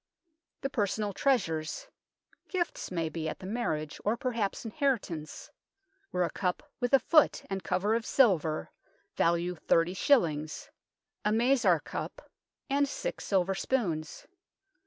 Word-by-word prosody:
The 275 - -1
personal 210 -3 0
treasures 160 - 0 0.6
gifts, 360 -3 -2
may 165 -3 -1
be, 160 0 -3
at - - -5
the - - -10
marriage, 160 -9 -2
or 215 +3 +1
perhaps 235 -5 -2
inheritances 220 - -2 0.6
were 180 - +1
a 170 - -1
cup, 180 -2 -1 0.2
with 245 -2 0
a - - +5
foot 310 +3 +4
and 195 -1 -2
cover 185 +4 +1
of 230 0 +1
silver, 170 - +2 0.4
value 170 +1 +2
thirty 165 +1 +2
shillings, 160 - +1 0.5
a - - +2
mazar 230 - +4
cup, - - -7 0.4
and 280 0 +2
six - - -4
silver 195 -1 +2
spoons. 180 - -2
195 Hz, 130 wpm, -30 LUFS, 165-245 Hz, 0.6 s, a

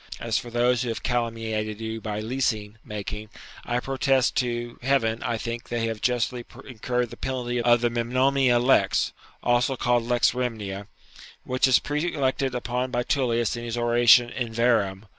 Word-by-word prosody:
As 115 -1 -2
for 120 - -9
those 120 +1 +2
who 125 - -2
have 115 - -4
calumniated 115 -3 -2
you 110 0 -5
by 105 -1 -4
leasing 110 -3 -2
making, 105 0 -6 0.4
I 120 0 0
protest 135 0 +1
to 120 -2 -2
Heaven 120 -4 +1
I 120 -1 -1
think 115 +1 -5
they 120 -1 -1
have 110 -2 -4
justly 125 0 0 0.2
incurred 125 -1 -2
the - - -9
penalty 125 -2 -2
of 120 0 +4
the 120 -1 +1
"Memnonia 130 +2 +2
Lex," 125 +3 +2 0.3
also 120 +2 +2
called 120 0 +2
"Lex 120 +1 +2
Rhemnia," 105 -6 -4 0.6
which 130 +1 +1
is 130 - +6
prelected 140 -4 -1
upon 125 +1 -2
by 120 -1 -1
Tullius 120 -4 0
in 120 - -6
his 120 0 -4
oration 120 0 +5
"In 120 -3 -3
Verrem." 110 -4 +1
120 Hz, 160 wpm, -25 LUFS, 115-125 Hz, 0.6 s, is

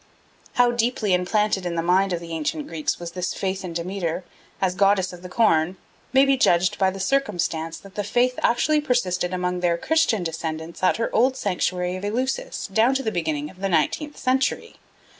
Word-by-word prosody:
How 245 -1 +4
deeply 235 -4 0
implanted 195 +2 +1
in 175 -1 -3
the 165 - -1
mind 185 +3 +3
of 175 - -1
the 170 0 -9
ancient 155 -1 -2
Greeks 160 -2 -2
was 170 -1 -6
this 180 +1 -3
faith 190 0 -2
in 180 - -5
Demeter 175 0 -3 0.4
as 185 -2 +1
goddess 195 -1 +2
of 175 - -10
the 180 - -9
corn 180 -5 +2 0.3
may 265 +1 +5
be 275 -1 +3
judged 175 -7 +3
by 190 -1 +4
the 195 +1 -6
circumstance 175 -10 -1
that 195 -1 -14
the 205 - -2
faith 245 +5 +1
actually 300 +6 +2
persisted 185 -10 0
among 180 0 -1
their 175 -1 +1
Christian 315 - +1
descendants 160 0 -5
at 185 - +3
her 230 - -2
old 255 +4 +3
sanctuary 180 -3 -1
of 185 - -9
Eleusis 250 +6 -2
down 230 +6 +4
to 270 - 0
the 220 - -1
beginning 155 -5 -2
of 185 - -20
the 195 - 0
nineteenth 195 - 0
century. 260 +1 0
185 Hz, 195 wpm, -23 LUFS, 175-230 Hz, 0.4 s, may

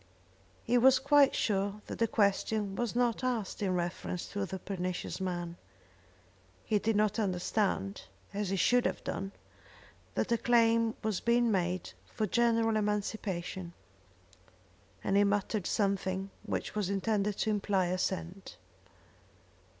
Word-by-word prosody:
He 245 +1 +3
was 260 +2 +7
quite 280 +1 +4
sure 200 0 0
that - - -7
the 230 - +3
question 205 -1 +1
was 240 +1 -2
not 245 0 +1
asked 235 -7 -2
in 190 -3 +1
reference 175 0 -3
to 200 -1 -3
the 190 - -4
pernicious 185 0 -4
man. 175 -2 -3 1.1
He 210 - +2
did 225 +1 0
not 210 +1 +2
understand, 185 - -1 0.3
as 205 -1 -2
he 195 - 0
should 245 +7 +3
have - - -4
done, 195 0 -4 0.8
that - - -1
a 235 - +3
claim 230 -1 +3
was 215 -4 0
being 235 0 +3
made 180 -2 -1 0.2
for 220 - -1
general 230 0 +2
emancipation, 200 -4 -2 1.3
and 195 - +1
he 200 - +6
muttered 205 -1 0
something 195 -2 0 0.2
which - - -3
was 210 -3 -1
intended 200 +1 0
to 215 - 0
imply 200 -2 +1
assent. 185 +1 -3
205 Hz, 135 wpm, -31 LUFS, 190-225 Hz, 1.3 s, was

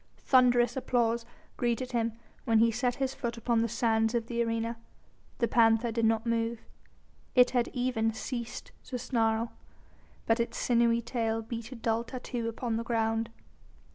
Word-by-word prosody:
Thunderous 245 -1 +4
applause 235 -3 0 0.3
greeted 245 +1 -1
him 230 -2 0 0.3
when 230 -3 +3
he 230 +1 +5
set 245 +1 0
his 270 -1 -1
foot 235 -1 -4
upon 230 -1 +1
the 230 - 0
sands 225 0 +1
of 230 -1 0
the 235 0 -2
arena. 230 0 -2 0.6
The 235 - +1
panther 230 -1 +3
did 230 0 +1
not 225 +1 +2
move. 230 0 -1 0.7
It 250 -1 +6
had 245 -2 +1
even 245 -3 0
ceased 235 +1 -6
to 255 - -4
snarl, 230 -2 0 0.7
but 225 +1 +2
its 235 - -2
sinewy 235 -1 +2
tail 225 -2 -1
beat 230 +1 -6
a - - -6
dull 230 0 0
tattoo 245 -1 -5
upon 230 0 -2
the 230 - -2
ground. 225 -1 0
230 Hz, 160 wpm, -30 LUFS, 225-245 Hz, 0.7 s, It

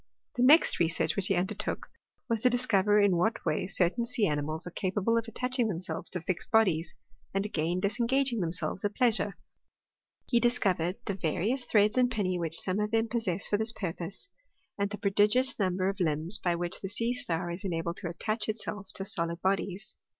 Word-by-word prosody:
The 245 - -1
next 290 +6 +6
research 165 -1 +1
which 200 -2 +1
he 195 - +2
undertook, 180 +2 -2 0.4
was 230 -3 0
to 250 - +5
dis 245 +1 0
cover 205 -1 +3
in 200 -4 +4
what 220 +6 0
way - - 0
certain 190 +5 +2
sea 240 -3 +2
animals 155 0 -2
are 180 - -6
capable 195 +5 0
of 230 0 0
attaching 250 +1 -1
themselves 170 -3 -4
to 180 - -4
fixed 175 +1 -2
bodies, 185 -8 +2 0.4
and 195 +1 +1
again 170 -2 -1
disengaging 235 +5 +1
themselves 175 +1 -2
at 205 0 -1
pleasure. 220 -5 +2 0.9
He 240 - +2
discovered 190 -7 +1
the 200 - -1
various 195 - -1
threads 210 +3 +3
and 250 -1 +4
pinnee 190 -6 -1
which 165 -1 0
some 185 +2 -1
of 210 0 0
them 225 0 +1
possess 200 -5 -1
for 205 - +1
this 220 +1 +2
purpose, 185 - -5 0.5
and 200 0 -1
the 210 - -5
prodigious 210 +6 +2
number 185 -1 +1
of 195 +1 -2
limbs 165 +3 0
by 175 -1 0
which 175 +1 -3
the 195 - -4
sea 230 +3 -1
star 175 -7 -2
is 175 +2 -5
enabled 170 -2 -2
to 170 - -4
attach 215 +5 -2
itself 210 -2 -4
to 195 - -4
solid 170 -4 -1
bodies. 195 +2 -1
200 Hz, 190 wpm, -29 LUFS, 175-225 Hz, 0.9 s, next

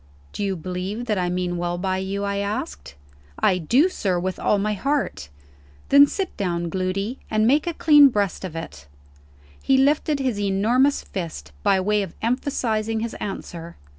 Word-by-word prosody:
"Do - - -3
you 195 -1 -1
believe 185 +7 -4
that 210 -5 0
I 180 -1 0
mean 180 0 -2
well 175 0 -2
by 185 +1 -1
you?" 195 +1 -3
I 200 0 -1
asked. 70 - -4 0.4
"I 180 - +2
do, 250 - +3
sir, 190 - -1
with 185 +1 -3
all 210 - +2
my 210 +1 0
heart." 275 - -2 0.6
"Then 280 +1 +8
sit 380 +4 -4
down, 175 -3 -2
Gloody, 195 +6 -2
and 215 0 +2
make 290 +7 +3
a 340 - -1
clean 300 -4 +7
breast 205 -7 -1
of 180 -4 -6
it." 75 - -8 0.7
He 270 - +3
lifted 295 +2 +2
his 255 -6 -1
enormous 220 +8 +2
fist, 160 - -6
by 190 - +3
way 210 +2 +1
of 190 -4 -6
emphasizing 225 -3 -1
his 230 0 -3
answer. 170 -4 -7
200 Hz, 170 wpm, -23 LUFS, 180-245 Hz, 0.7 s, Then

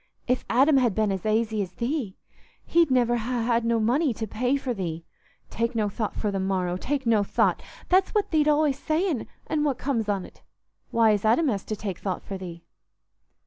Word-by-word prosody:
If 250 +1 0
Adam 275 +4 +4
had 240 -6 +2
been 215 -2 +1
as 190 +1 -3
aisy 220 0 +1
as 185 -2 -5
thee, 235 - -3 0.5
he'd 335 -2 +3
niver 240 -2 +3
ha' 235 0 -2
had 235 -1 +2
no 230 0 +1
money 250 +4 +1
to 225 - -3
pay 245 +6 0
for 265 -2 -3
thee. 170 -5 -5 0.5
Take 230 +1 -1
no 215 -2 +1
thought 210 +1 -3
for 210 - -1
the 195 - -2
morrow—take 190 +8 -1
no 220 -3 +3
thought—that's 370 - 0
what 420 - +1
thee't 305 -2 +3
allays 295 -2 +2
sayin'; 315 - -1 0.2
an' 300 -1 -1
what 280 -4 0
comes 240 -5 -1
on't? 195 -3 -4 0.5
Why, 230 -1 +4
as 205 -2 0
Adam 240 +8 +3
has 200 -5 -2
to 215 - -3
take 195 -3 -5
thought 190 -3 -3
for 195 -1 -6
thee." 170 -2 -8
230 Hz, 190 wpm, -26 LUFS, 205-270 Hz, 0.5 s, Adam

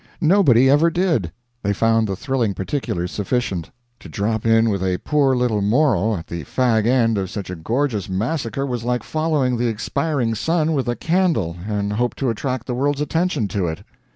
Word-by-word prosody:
Nobody 155 - +5
ever 145 +5 +5
did. 165 - 0 0.3
They 100 0 0
found 115 +1 +2
the 95 - -2
thrilling 120 -3 -1
particulars 95 -5 -3
sufficient. 100 -5 -2 0.3
To - - -12
drop 110 +2 -1
in 115 0 +4
with 100 -2 -2
a 90 -1 0
poor 135 - +2
little 120 -4 +1
moral 110 - +2
at 85 - -8
the 85 -2 -6
fag 115 - +1
end 115 -4 +2
of 95 -2 -3
such 100 -2 -6
a - - -4
gorgeous 110 - -1
massacre 115 +7 -2
was 125 -4 -3
like 125 0 -1
following 155 -6 0
the 120 +1 0
expiring 120 +2 -1
sun 160 +7 0
with 135 -4 -1
a 120 - 0
candle 165 - 0
and 105 -1 -1
hope 120 +3 -1
to 130 -4 0
attract 125 +2 -3
the 125 - -3
world's 140 +3 0
attention 160 - 0
to 95 -3 -1
it. 80 0 -5
120 Hz, 185 wpm, -21 LUFS, 105-140 Hz, 0.3 s, Nobody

